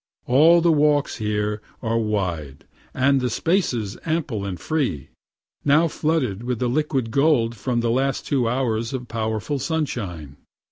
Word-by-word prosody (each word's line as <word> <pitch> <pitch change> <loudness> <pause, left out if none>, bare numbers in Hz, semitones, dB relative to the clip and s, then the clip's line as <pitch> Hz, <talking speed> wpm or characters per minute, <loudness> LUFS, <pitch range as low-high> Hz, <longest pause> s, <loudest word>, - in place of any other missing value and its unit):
All 160 +7 +6
the 170 0 +4
walks 150 -2 +2
here 105 -1 -1 0.2
are 115 0 +1
wide, 90 -10 -3 0.3
and 135 +1 +2
the 125 - 0
spaces 120 - 0
ample 150 -11 -2
and 95 -3 -5
free 125 - -2 0.5
now 150 +4 +4
flooded 150 -10 -1
with 120 -1 -3
liquid 130 -2 0
gold 135 -4 +2
from 120 +1 -1
the 115 -1 +1
last 135 +2 0
two 125 -5 +1
hours 115 -2 -1
of 125 -2 -4
powerful 110 +5 -2
sunshine. 105 - -3
125 Hz, 140 wpm, -23 LUFS, 110-145 Hz, 0.5 s, All